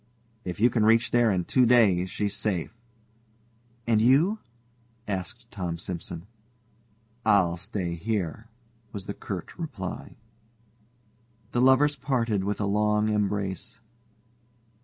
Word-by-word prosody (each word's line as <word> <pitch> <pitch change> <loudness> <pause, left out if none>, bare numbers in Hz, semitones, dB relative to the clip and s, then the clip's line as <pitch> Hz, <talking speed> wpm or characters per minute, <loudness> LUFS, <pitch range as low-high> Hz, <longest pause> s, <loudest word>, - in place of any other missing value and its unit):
"If 90 -1 -5
you 120 +3 +5
can 115 -2 +2
reach 115 +2 +4
there 120 -2 +4
in 90 -3 0
two 130 - +3
days 105 -7 +4
she's 100 0 -2
safe." 100 -4 -1 1.1
"And 110 -2 +3
you?" 150 - +4 0.7
asked 95 -4 -5
Tom 90 -4 -4
Simson. 85 -1 -6 1.0
"I'll 90 -4 +4
stay 95 -2 -4
here," 100 +2 -3 0.5
was 100 -2 -6
the 100 - -4
curt 95 -5 -6
reply. 115 - -6 1.4
The 120 - +1
lovers 130 +3 +5
parted 120 -7 0
with 100 +1 -2
a 105 - 0
long 105 +1 +2
embrace. 100 -1 -2
105 Hz, 115 wpm, -27 LUFS, 95-115 Hz, 1.4 s, you